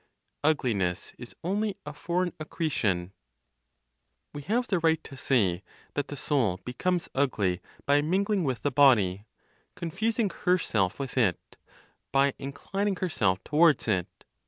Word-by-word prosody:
UGLINESS 110 - 0
IS 120 - -10
ONLY 205 +4 -1
A 150 - -6
FOREIGN 175 +3 -1
ACCRETION. 110 - -1 1.2
We 145 - -6
have 235 - 0
the 185 - +1
right 160 -1 +2
to 135 - -10
say 100 -10 +1 0.3
that 145 - -2
the 145 - -6
soul 120 -11 0
becomes 175 +8 -1
ugly 105 -10 +1 0.2
by 145 +1 +4
mingling 190 +5 +1
with 130 -6 -2
the 145 - +1
body, 110 -8 +4 0.5
confusing 210 +5 -1
herself 110 - +1
with 135 -1 -3
it, 100 -8 0 0.6
by 140 0 +3
inclining 195 +9 -2
herself 100 - 0
towards 150 -4 +4
it. 95 -5 +1
145 Hz, 130 wpm, -28 LUFS, 110-175 Hz, 1.2 s, by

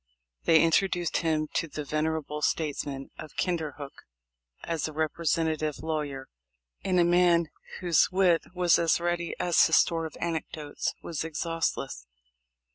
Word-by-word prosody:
They 160 0 +6
introduced 175 +1 +2
him 155 -2 0
to 165 - 0
the 150 -1 -6
venerable 155 0 -2
states 150 -1 0
man 135 -1 -6
of 155 - -9
Kinderhook 155 -5 -3 0.7
as 165 -2 -2
a 155 - -8
representative 155 -1 0
lawyer, 150 -4 -3 0.6
and 185 -2 +2
a - - +6
man 175 -2 +3 0.3
whose 175 -4 +4
wit 180 -3 +4
was 180 -1 +4
as 165 0 +3
ready 175 0 -1
as 175 -2 +4
his - - +5
store 165 -2 +2
of 155 - -13
anec 165 -2 -2
dotes 150 -2 -4
was 165 -3 -3
exhaustless. 160 - -3
160 Hz, 140 wpm, -28 LUFS, 150-170 Hz, 0.7 s, They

